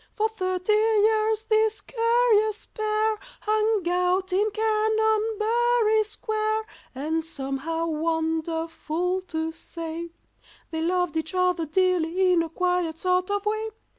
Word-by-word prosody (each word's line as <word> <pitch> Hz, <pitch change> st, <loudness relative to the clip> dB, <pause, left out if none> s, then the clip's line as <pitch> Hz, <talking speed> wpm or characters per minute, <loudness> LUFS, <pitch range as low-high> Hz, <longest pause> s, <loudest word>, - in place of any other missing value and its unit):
For 435 Hz, 0 st, +2 dB
thirty 370 Hz, -1 st, -1 dB
years 435 Hz, 0 st, +3 dB
this 440 Hz, -1 st, +2 dB
curious 455 Hz, -2 st, +2 dB
pair 430 Hz, 0 st, -1 dB, 0.2 s
Hung 430 Hz, -3 st, +1 dB
out 360 Hz, +1 st, +1 dB
in 410 Hz, +3 st, +2 dB
Canonbury 440 Hz, +1 st, +2 dB
Square, 435 Hz, 0 st, -2 dB, 0.3 s
And 315 Hz, +4 st, -1 dB
somehow, 310 Hz, +2 st, -3 dB
wonderful 325 Hz, +2 st, -1 dB
to 320 Hz, -1 st, -2 dB
say, 330 Hz, +1 st, -6 dB, 0.6 s
They 320 Hz, -1 st, -2 dB
loved 355 Hz, -1 st, 0 dB
each 320 Hz, +2 st, -3 dB
other 360 Hz, -3 st, +1 dB
dearly 365 Hz, +1 st, +2 dB
in 340 Hz, -, +4 dB
a 330 Hz, -, -3 dB
quiet 360 Hz, -1 st, 0 dB
sort 365 Hz, +1 st, +1 dB
of 405 Hz, 0 st, -1 dB
way. 435 Hz, +1 st, -1 dB
375 Hz, 115 wpm, -25 LUFS, 330-435 Hz, 0.6 s, in